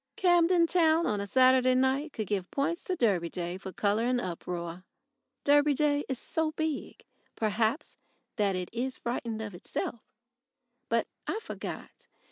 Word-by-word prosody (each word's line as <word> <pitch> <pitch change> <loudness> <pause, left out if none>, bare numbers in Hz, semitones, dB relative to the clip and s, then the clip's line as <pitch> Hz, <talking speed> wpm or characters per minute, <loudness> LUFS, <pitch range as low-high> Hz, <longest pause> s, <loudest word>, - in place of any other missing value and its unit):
Camden 350 -1 +4
Town 330 -1 +3
on 210 -7 0
a 200 - -4
Saturday 255 +2 +5
night 265 +4 +1
could 215 - -4
give 195 -2 -2
points 335 +5 -1
to 370 - -1
Derby 195 - +1
Day 175 +1 -4
for 190 0 -7
colour 205 +3 +1
and 250 0 +2
uproar. 175 -2 -5 0.6
Derby 290 0 +4
Day 290 0 +1
is 265 - -1
so 315 +5 -1
big, 315 -2 -3 0.3
perhaps, 220 +5 -1 0.4
that 200 -4 +1
it 180 -1 -4
is 255 +2 -2
frightened 230 -2 -3
of 205 -3 -6
itself. 200 +6 -4 0.9
But 230 0 +2 0.2
I - - -1
forgot. 450 - -8
245 Hz, 150 wpm, -29 LUFS, 200-295 Hz, 0.9 s, Saturday